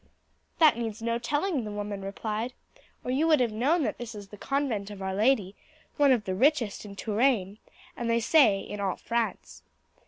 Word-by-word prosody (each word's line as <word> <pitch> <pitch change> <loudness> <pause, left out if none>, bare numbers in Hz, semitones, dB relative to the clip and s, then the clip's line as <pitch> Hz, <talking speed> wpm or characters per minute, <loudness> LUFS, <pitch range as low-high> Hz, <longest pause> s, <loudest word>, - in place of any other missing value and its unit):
"That 310 -8 +5
needs 225 -1 -4
no 230 0 0
telling," 290 +3 -1
the 215 - -5
woman 205 -1 -5
replied, 215 +4 -4 0.5
"or 250 - -3
you 290 +5 +2
would 310 -2 +5
have 240 -3 +1
known 285 +10 +1
that - - -2
that 240 -2 -7
is 200 -1 -9
the 210 - -10
convent 235 -4 -2
of 205 -2 -9
Our 190 0 -3
Lady, 210 -2 +2 0.4
one 285 -2 +5
of 240 -5 +3
the 190 - -2
richest 240 -2 +1
in 200 -1 -9
Touraine, 215 -2 0 0.4
and 235 -1 -3
they 230 0 +3
say 230 -5 +4
in 205 - -7
all 195 -2 -1
France. 235 -1 -3
230 Hz, 190 wpm, -28 LUFS, 205-265 Hz, 0.5 s, That